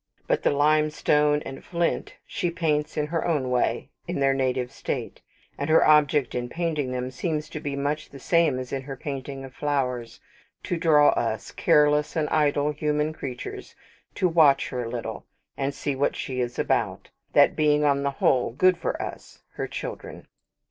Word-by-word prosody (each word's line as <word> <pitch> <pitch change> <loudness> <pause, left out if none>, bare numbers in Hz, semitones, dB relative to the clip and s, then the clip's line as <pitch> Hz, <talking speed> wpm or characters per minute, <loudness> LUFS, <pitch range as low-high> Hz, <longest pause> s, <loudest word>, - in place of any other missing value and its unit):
But - - +1
the - - +3
limestone 150 0 +2
and 135 - -8
flint 170 -1 -2
she 185 -4 -2
paints, 155 -3 -1
in 150 - +1
her 165 +2 -2
own 145 -7 0
way, 125 - 0 0.2
in - - -3
their 135 0 +3
native 130 -2 -1
state: - - -5 0.4
and 140 - -2
her 160 - +5
object 150 -2 +4
in 120 0 -3
painting 155 -4 -2
them 125 0 -3
seems 155 +3 -3
to 155 - -6
be 145 -2 -4
much 145 +2 -2
the 140 - -11
same 165 -2 +2
as 130 -1 -6
in 135 - -1
her 135 0 -7
painting 135 -1 -6
of 130 - -12
flowers; 125 -5 -2 0.4
to - - -2
draw 155 -3 +5
us, 110 -2 -1
careless 150 -2 +3
and 155 -2 +1
idle 150 -1 +2
human 150 +1 -1
creatures, 130 -5 -7 0.4
to 185 - +2
watch 160 -5 +4
her 125 -2 -3
a - - -5
little, 120 -1 -5 0.3
and 135 0 -1
see 140 0 -3
what 140 +2 0
she 130 -1 -4
is 120 0 -3
about - - -1 0.2
that - - +5
being 150 -1 +3
on 140 -1 +3
the 140 - 0
whole 130 -3 +1
good 185 +6 +3
for - - -2
us, - - -8
her - - -4
children. - - -7
145 Hz, 180 wpm, -25 LUFS, 135-155 Hz, 0.4 s, her